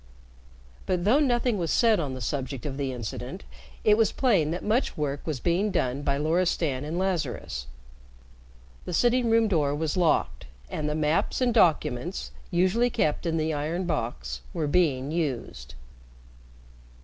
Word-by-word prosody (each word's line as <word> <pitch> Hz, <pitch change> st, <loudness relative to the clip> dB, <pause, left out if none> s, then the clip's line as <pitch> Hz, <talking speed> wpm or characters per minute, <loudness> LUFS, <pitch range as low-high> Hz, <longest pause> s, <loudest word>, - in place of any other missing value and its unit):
But 180 Hz, -2 st, 0 dB
though 245 Hz, +8 st, +5 dB
nothing 240 Hz, -6 st, +1 dB
was 170 Hz, -2 st, -1 dB
said 225 Hz, +2 st, +4 dB
on 140 Hz, -5 st, -3 dB
the 130 Hz, -, -7 dB
subject 130 Hz, +1 st, -3 dB
of 140 Hz, -2 st, -3 dB
the 135 Hz, -1 st, -2 dB
incident, 115 Hz, -, -6 dB, 0.4 s
it 210 Hz, 0 st, +5 dB
was 225 Hz, -2 st, +3 dB
plain 195 Hz, -, +2 dB
that 170 Hz, +3 st, -3 dB
much 225 Hz, +5 st, 0 dB
work 145 Hz, -1 st, -2 dB
was 150 Hz, -5 st, -2 dB
being 175 Hz, -, +1 dB
done 135 Hz, -7 st, -1 dB
by 140 Hz, -1 st, 0 dB
Loristan 155 Hz, -3 st, 0 dB
and 155 Hz, +3 st, -4 dB
Lazarus. 150 Hz, -, -2 dB, 1.2 s
The 180 Hz, -, -3 dB
sitting 240 Hz, +3 st, +3 dB
room 225 Hz, 0 st, +4 dB
door 150 Hz, -7 st, +1 dB
was 155 Hz, 0 st, -2 dB
locked, 175 Hz, -, +1 dB, 0.2 s
and 150 Hz, -1 st, -2 dB
the 150 Hz, -, -1 dB
maps 155 Hz, +1 st, +1 dB
and 250 Hz, -2 st, +2 dB
documents, 170 Hz, -, +1 dB, 0.2 s
usually 190 Hz, +8 st, +2 dB
kept 155 Hz, -6 st, 0 dB
in 165 Hz, 0 st, 0 dB
the 155 Hz, 0 st, 0 dB
iron 160 Hz, +5 st, -2 dB
box, 90 Hz, -, -3 dB
were 160 Hz, -, 0 dB
being 145 Hz, -4 st, +1 dB
used. 120 Hz, -, -3 dB
160 Hz, 155 wpm, -27 LUFS, 140-190 Hz, 1.2 s, though